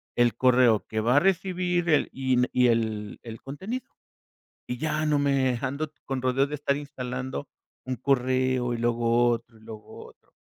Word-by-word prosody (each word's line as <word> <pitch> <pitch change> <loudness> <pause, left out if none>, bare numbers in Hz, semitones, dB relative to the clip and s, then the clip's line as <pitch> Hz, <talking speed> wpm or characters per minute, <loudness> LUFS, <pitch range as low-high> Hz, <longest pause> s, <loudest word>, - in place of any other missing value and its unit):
el 120 -1 +3
correo 125 -4 +4
que 110 - -3
va 120 +4 +2
a - - +8
recibir 180 -1 0
el 155 - +3
y 130 -1 0
y 125 0 +4
el 110 -3 -1
el 115 -1 -9
contenido. 190 - -6 0.8
Y 125 - -3
ya 155 +1 -1
no 150 -1 +2
me 135 -3 +2
ando 145 +3 -3
con 135 -1 -3
rodeos 130 +2 +2
de 150 - -4
estar 140 -1 0
instalando 130 -1 -5 0.4
un 130 - -1
correo, 130 -1 +1
y - - -4
luego 120 0 +2
otro, 115 -1 -4
y - - -22
luego 110 -1 -11
otro. - - -22
130 Hz, 170 wpm, -26 LUFS, 120-145 Hz, 0.8 s, a